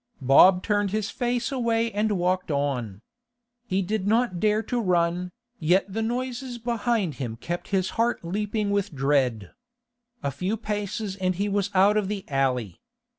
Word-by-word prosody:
Bob 180 +8 +6
turned 205 -2 +1
his 215 +1 -2
face 245 0 -1
away 230 -3 0
and 210 +1 0
walked 185 -1 0
on. 125 -8 -2 0.6
He 190 -1 0
did 205 +1 -2
not 225 -4 +2
dare 215 +2 +2
to 245 0 -1
run, 180 -1 +1 0.3
yet 185 +4 +2
the 225 - -1
noises 245 +2 -3
behind 230 - -1
him 115 -3 -3
kept 170 +9 -5
his 190 -2 0
heart 235 -6 0
leaping 210 +3 -1
with 200 -5 -1
dread. 130 -7 +1 0.7
A 140 - 0
few 185 +10 -2
paces 210 -1 -3
and 185 -1 0
he 200 +3 -1
was 200 -1 0
out 200 +3 +5
of 210 -2 0
the 200 -1 -4
alley. 125 - -1
195 Hz, 160 wpm, -25 LUFS, 170-220 Hz, 0.7 s, Bob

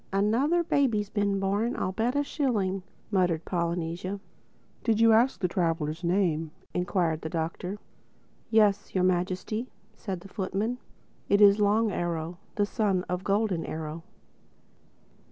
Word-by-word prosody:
"Another 235 - +2
baby's 230 -10 +1
been 200 -2 +1
born, 205 +5 0
I'll 185 - -1
bet 230 +7 0
a 285 - +2
shilling," 215 - 0 0.3
muttered 175 -5 +1
Polynesia. 170 +2 -2 0.6
"Did 225 -2 +2
you 230 0 +6
ask 240 +4 +3
the 180 - +1
traveler's 165 -2 -1
name?" 170 -3 +1 0.2
enquired 175 -3 0
the 160 - -4
Doctor. 170 +4 -3 0.7
"Yes, 210 -3 +3
Your 185 - +3
Majesty," 185 +6 0 0.3
said 190 -5 -5
the 195 - -11
footman. 205 +5 -2 0.5
"It 200 - +4
is 205 0 +7
Long 210 +1 +3
Arrow, 170 -1 -3 0.2
the 205 - +2
son 205 -4 0
of 180 +1 -3
Golden 200 -4 +1
Arrow." 160 +1 -5
195 Hz, 135 wpm, -28 LUFS, 175-215 Hz, 0.7 s, is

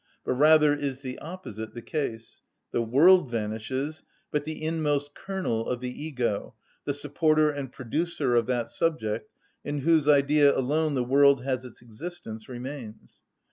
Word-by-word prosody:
But - - +1
rather 150 +2 +6
is 140 -2 -3
the 130 -1 -6
opposite 120 - -8
the 120 - -6
case; 115 -7 -4 0.3
the - - 0
world 145 +7 +5
vanishes, 115 +7 -3 0.3
but 150 -1 -1
the 155 0 -5
inmost 150 -3 -1
kernel 185 -13 -3
of 125 - -1
the 125 0 -4
ego, 125 -8 -3 0.3
the 140 - 0
supporter 155 +1 +2
and 140 -3 -5
producer 145 +2 -2
of 120 -2 +3
that 120 -2 -1
subject, 110 -10 -1 0.3
in 145 -1 -3
whose 160 0 +3
idea 145 0 +5
alone 150 +3 +1
the 125 - +1
world 140 +1 +4
has 130 -1 -2
its 120 -1 -12
existence, 115 -3 -8
remains. 125 -3 -8
140 Hz, 150 wpm, -27 LUFS, 120-155 Hz, 0.3 s, rather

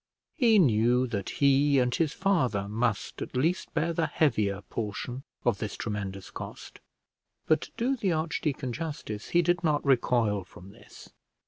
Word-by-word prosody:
He 230 -5 +4
knew 125 - +4
that 100 -6 -3
he 140 0 +3
and 125 -1 +2
his 160 +1 +1
father 130 - +1
must 110 +1 -2
at - - -6
least 165 +7 0
bear 165 +2 +1
the 165 -1 0
heavier 105 -10 +1
portion 115 +5 -4 0.2
of 120 -5 +2
this 105 - -4
tremendous 100 -3 -5
cost; - - -9 0.7
but 155 - +3
to - - -9
do 255 +4 +1
the 200 -7 0
archdeacon 155 -5 -2
justice, 145 -9 -5
he 175 0 +3
did 175 +1 +1
not 150 -3 +1
recoil 120 -6 +2
from 90 +1 -14
this. - - -15
130 Hz, 155 wpm, -28 LUFS, 105-160 Hz, 0.7 s, He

